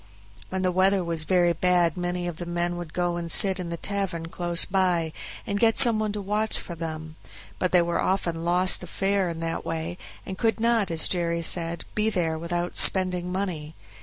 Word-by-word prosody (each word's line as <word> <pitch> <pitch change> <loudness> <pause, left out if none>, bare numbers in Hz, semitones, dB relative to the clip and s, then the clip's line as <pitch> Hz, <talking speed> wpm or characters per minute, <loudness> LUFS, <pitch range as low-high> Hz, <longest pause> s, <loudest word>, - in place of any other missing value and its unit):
When 190 0 -3
the 185 - +1
weather 190 +1 +2
was 165 -2 -1
very 175 -1 +2
bad 175 -1 +2
many 175 0 -3
of 170 -2 -5
the 175 - -7
men 175 0 -2
would 175 -2 -7
go 175 0 -1
and 170 -1 -5
sit 195 +1 +4
in 175 -2 -5
the 170 - -4
tavern 185 -4 -4
close 175 0 +1
by, 180 -4 0 0.3
and 200 0 -2
get 225 0 +3
some 235 -5 +7
one 215 -1 -1
to 205 -1 -5
watch 210 +2 0
for 175 - -6
them; 160 -1 -7 0.4
but 185 - 0
they 180 - +5
often 170 -1 -1
lost 180 +2 +3
a 180 - -8
fare 195 +1 0
in 165 -1 -6
that 165 0 -3
way, 165 +2 -4 0.3
and 190 - -7
could 225 0 +1
not, 230 -3 +2
as 165 -1 -1
Jerry 170 -2 -1
said, 165 0 +1
be 215 +1 +1
there 165 -6 -1
without 175 +1 -3
spending 180 -2 +3
money. 175 -5 -4
175 Hz, 200 wpm, -25 LUFS, 170-190 Hz, 0.4 s, some